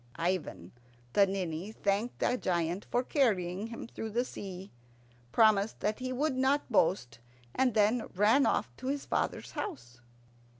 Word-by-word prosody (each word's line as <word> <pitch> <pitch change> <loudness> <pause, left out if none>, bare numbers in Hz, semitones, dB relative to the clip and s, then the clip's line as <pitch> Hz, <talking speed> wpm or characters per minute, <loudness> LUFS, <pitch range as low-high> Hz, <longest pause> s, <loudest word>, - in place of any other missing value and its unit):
Ivan 165 - -2 0.4
the 200 +4 +5
Ninny 185 0 -3
thanked 210 +2 -1
the 245 - +2
giant 175 -3 -1
for 245 - +1
carrying 205 - +1
him 230 0 -7
through 225 -1 -6
the 240 +4 0
sea, 190 -4 -8 0.6
promised 215 -2 +3
that 210 +3 -1
he 255 0 -3
would 275 +2 0
not 265 +1 +1
boast, 125 - +1 0.3
and 255 -4 +1
then 220 +2 +3
ran 215 +8 +4
off - - 0
to 260 - -6
his 280 +1 -2
father's - - -2
house. 120 - -6
210 Hz, 145 wpm, -31 LUFS, 185-250 Hz, 0.6 s, the